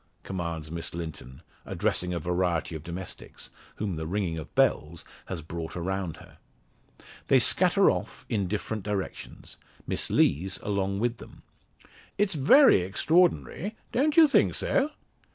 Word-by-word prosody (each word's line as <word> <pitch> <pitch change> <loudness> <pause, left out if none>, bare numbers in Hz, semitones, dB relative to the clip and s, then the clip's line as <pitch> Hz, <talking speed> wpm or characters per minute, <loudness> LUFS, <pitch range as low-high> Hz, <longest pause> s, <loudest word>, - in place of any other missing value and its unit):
commands 85 -4 -5
Miss 85 0 -5
Linton, 80 -4 -8 0.2
addressing 90 0 -1
a 90 - -1
variety 90 0 -1
of 80 - -6
domestics, 90 +1 -8 0.2
whom 100 -6 -3
the 80 0 -4
ringing 90 -2 -1
of 80 -2 -8
bells 80 +2 +1 0.2
has 85 -4 -5
brought 80 0 -6
around 90 -1 -3
her. - - -16 0.9
They - - +5
scatter - - +4
off - - -6
in 100 -4 -1
different 105 +2 -3
directions, 100 -1 -6 0.3
Miss - - -1
Lees 90 +6 +2
along 100 -1 -1
with 120 +2 -1
them. - - -14 0.7
"It's 200 -1 +1
very 160 - +6
extraordinary. 175 - +1 0.2
Don't 295 +5 +1
you 325 -2 +9
think 285 - +3
so?" 275 +2 +1
95 Hz, 135 wpm, -27 LUFS, 85-110 Hz, 0.9 s, you